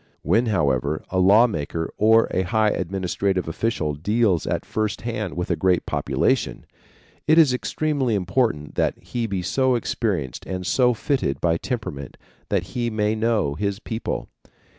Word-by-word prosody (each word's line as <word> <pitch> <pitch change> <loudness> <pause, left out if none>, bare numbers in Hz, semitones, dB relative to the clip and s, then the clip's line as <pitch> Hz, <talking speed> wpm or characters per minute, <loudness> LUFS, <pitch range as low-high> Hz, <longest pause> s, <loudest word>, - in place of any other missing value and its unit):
When, 110 - +2
however, 75 - 0
a 95 - +1
law 100 +6 +6
maker 80 -5 -3
or 110 +2 +4
a 95 - +1
high 105 +4 +2
administrative 95 0 -1
official 80 -4 -1
deals 100 +3 +1
at - - -2
first 110 -2 -2
hand 110 -5 -4
with 90 - -2
a - - +2
great 90 -2 +1
population, - - 0 0.6
it 155 - +5
is 155 -6 +6
extremely 135 -2 -1
important 95 - 0
that - - 0
he 120 -2 -4
be 95 -3 -3
so 130 +7 +2
experienced 100 - -2
and 90 -1 -4
so 125 +4 +3
fitted 130 - -1
by 85 -1 +1
temperament 85 - -5 0.3
that - - +1
he 120 -1 -1
may 105 -1 0
know 110 -9 +1
his 100 +5 -2
people. 110 +1 -4
105 Hz, 155 wpm, -23 LUFS, 90-115 Hz, 0.6 s, law